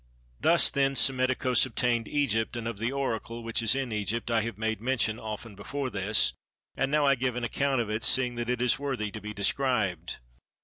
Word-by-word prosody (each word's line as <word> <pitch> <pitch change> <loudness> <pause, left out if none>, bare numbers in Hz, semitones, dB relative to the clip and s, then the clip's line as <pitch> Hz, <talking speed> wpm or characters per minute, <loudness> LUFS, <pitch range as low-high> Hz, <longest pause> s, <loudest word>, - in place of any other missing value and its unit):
Thus - - +4
then 135 0 +1
Psammetichos 130 -2 +3
obtained 120 -2 0
Egypt: 120 -6 0
and 115 -1 -4
of 115 -4 -5
the 115 +3 -1
Oracle 120 -4 -3
which 115 0 -1
is 115 +2 +3
in 135 -3 -2
Egypt 110 +3 -2
I 115 -1 +3
have 110 -2 -5
made 110 -1 -2
mention 120 -3 0
often 110 +1 -7
before 130 +7 -5
this, 105 +1 +1 0.4
and 135 - 0
now 150 0 +2
I 140 - +5
give 130 -2 -1
an 125 - -3
account 135 +2 0
of 110 - -4
it, 110 +1 -2
seeing 125 -2 +4
that 120 0 -4
it 125 0 0
is 125 - +3
worthy 130 -7 -3
to 105 - -7
be 105 +1 -6
described. 105 -2 -1
120 Hz, 205 wpm, -28 LUFS, 110-130 Hz, 0.4 s, I